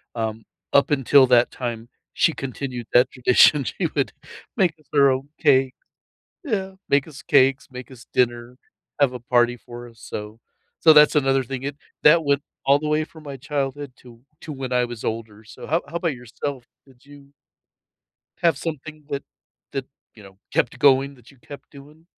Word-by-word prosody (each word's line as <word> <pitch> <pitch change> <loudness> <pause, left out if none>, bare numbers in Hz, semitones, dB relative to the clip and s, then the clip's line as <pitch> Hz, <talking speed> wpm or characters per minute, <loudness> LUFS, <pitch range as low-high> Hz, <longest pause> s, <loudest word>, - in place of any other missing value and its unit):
Um, 110 -1 -3 0.3
up 140 - +4
until 135 -1 +5
that 120 -1 +4
time, 120 -2 -5 0.2
she 165 - +2
continued 130 -3 -6
that 125 +1 +4
tradition. 130 +3 +4
She - - -2
would - - 0 0.5
make 180 -4 +2
us 150 - -27
our 140 -2 +5
own 130 +2 -3
cake 135 -3 +3 0.7
Yeah, 195 -9 -2 0.2
make 140 +1 +2
us 140 -3 -12
cakes, 135 -1 +3
make 125 0 -10
us 125 -1 -14
dinner, 120 0 -1 0.4
have 140 -3 +4
a 125 - -7
party 120 0 +2
for 120 0 -11
us, 115 -1 -19
so 105 +2 -8 0.4
so 160 - +7
that's 150 0 +6
another 135 -2 +2
thing, 130 +1 -6
it 140 0 -4 0.3
that 160 +1 +6
went 140 0 +1 0.2
all 140 +1 +4
the 150 +1 -4
way 150 +1 +1
from 160 0 -16
my 140 -1 -7
childhood 140 0 -4
to 120 -2 -16 0.2
to 155 - -7
when 130 -2 -6
I 125 0 +2
was 120 -2 -7
older. 110 -1 -5
So 110 - -11
how 165 +3 0
how 170 - -4
'bout 170 -4 -1
yourself? 125 +2 -6 0.2
Did 130 -2 -23
you 140 -1 -17 1.1
have 170 -1 +3
something 155 -1 -7
that 140 - -3 0.5
that, 135 -1 -4 0.3
you 110 - -15
know, 95 -1 -16 0.2
kept 120 +2 0
going 140 0 +4
that 125 -2 -19
you 140 - -22
kept 145 +3 -13
doing? 150 +3 -16
135 Hz, 180 wpm, -22 LUFS, 120-145 Hz, 1.1 s, so